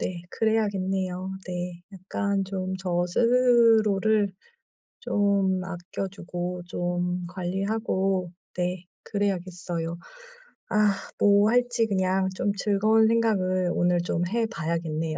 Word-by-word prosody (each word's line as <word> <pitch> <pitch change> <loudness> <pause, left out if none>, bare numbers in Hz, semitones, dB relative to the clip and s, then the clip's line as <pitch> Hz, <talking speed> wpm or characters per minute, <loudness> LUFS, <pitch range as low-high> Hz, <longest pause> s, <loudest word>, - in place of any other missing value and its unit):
네. 175 -2 -3
그래야겠네요 190 -4 0 0.2
네. 175 -1 -5
약간 195 +1 -2
좀 190 -1 -3
저 175 -1 0
스스로를 220 -2 +3 0.7
좀 200 -2 +1
아껴 180 +2 -5
주고 180 -1 -5
좀 175 0 -2
관리하고 190 0 -1 0.2
네 180 0 -2 0.2
그래야겠어요. 175 -4 -3 0.7
아 210 -1 +3 0.3
뭐 205 +1 +5
할지 245 -1 +2
그냥 190 -1 +1
좀 200 +1 0
즐거운 215 +3 +3
생각을 185 -6 +1
오늘 175 0 +2
좀 175 0 -1
해 230 +3 0
봐야겠네요. 165 -5 -2
190 Hz, 220 characters per minute, -26 LUFS, 180-205 Hz, 0.7 s, 뭐